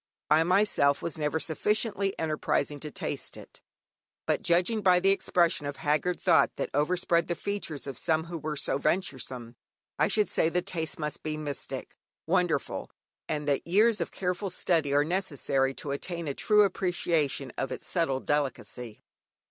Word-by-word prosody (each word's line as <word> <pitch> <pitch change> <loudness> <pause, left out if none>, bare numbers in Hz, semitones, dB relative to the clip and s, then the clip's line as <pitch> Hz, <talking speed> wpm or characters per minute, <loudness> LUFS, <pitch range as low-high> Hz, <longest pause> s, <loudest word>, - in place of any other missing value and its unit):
I 155 +1 +6
myself 180 -6 +3
was 165 -1 -3
never 150 +1 0
sufficiently 200 +4 0
enterprising 155 -2 -1
to 150 - -7
taste - - -5
it, - - -12 0.6
but - - +1
judging 180 +6 +2
by 185 -2 +5
the 195 +2 +4
expression 170 -6 +2
of 145 - -4
haggard 155 +6 0
thought 175 -3 +4
that - - -3
overspread 170 +3 +1
the 175 - -1
features 200 -8 -4
of 135 -3 -4
some 160 0 +1
who 170 0 -6
were 150 0 -4
so 140 - 0
venturesome, 130 -9 -2 0.4
I - - +4
should 210 -1 +2
say 160 - +1
the 180 +1 0
taste 160 -3 -4
must 150 -1 -4
be 155 0 -3
"mystic, 145 -2 -5 0.3
wonderful," 175 -5 0 0.4
and 150 -1 -2
that 140 +2 0
years 215 +5 +4
of - - -2
careful 180 +1 -2
study 165 -5 +1
are 145 +1 +3
necessary 140 -6 0
to 145 - -5
attain 170 +4 -3
to 145 - -1
a - - -5
true 210 +7 +4
appreciation 170 -8 0
of 135 - -3
its - - -5
subtle 150 -7 0
delicacy. 130 -5 -3
160 Hz, 165 wpm, -28 LUFS, 145-180 Hz, 0.6 s, I